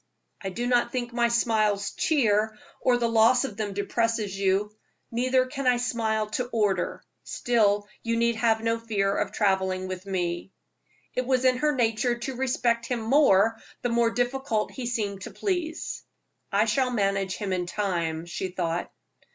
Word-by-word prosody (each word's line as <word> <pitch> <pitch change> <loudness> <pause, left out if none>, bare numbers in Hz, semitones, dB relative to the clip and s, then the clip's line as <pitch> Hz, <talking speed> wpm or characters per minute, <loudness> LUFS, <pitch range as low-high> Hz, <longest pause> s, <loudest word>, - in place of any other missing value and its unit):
"I 195 - -2
do 235 +6 -3
not 245 -1 +2
think 240 -2 -3
my 235 0 +3
smiles 215 -4 +1
cheer, 220 -7 +1 0.2
or 250 -1 +3
the 235 -1 +1
loss 230 +3 +4
of 265 -7 -4
them 205 -2 -4
depresses 215 0 -1
you. 195 +2 0 0.4
Neither 255 +2 +2
can 275 0 -4
I 250 -1 +5
smile 225 -3 0
to 250 +3 -1
order; 215 -5 0 0.2
still 205 -4 +1
you 230 0 -1
need 235 0 +2
have 225 -1 +2
no 230 0 +1
fear 200 -3 0
of - - -1
traveling 190 -2 0
with 185 +1 -6
me." 175 -1 -2 0.6
It 255 0 -2
was 260 -1 +2
in 255 -1 +4
her 300 +2 +1
nature 240 0 +1
to 250 +2 -5
respect 240 -2 0
him 245 -2 -2
more, 225 -4 +4 0.2
the 245 - +1
more 235 0 +3
difficult 245 -1 -1
he 255 -3 -5
seemed 205 -5 -2
to - - -6
please. 355 -5 -3 0.5
"I 205 +2 +3
shall 250 +4 +1
manage 195 -4 0
him 200 -3 -3
in 180 -1 -1
time," 170 -5 -2
she 170 +2 -4
thought. 175 -2 -3
225 Hz, 165 wpm, -26 LUFS, 200-245 Hz, 0.6 s, I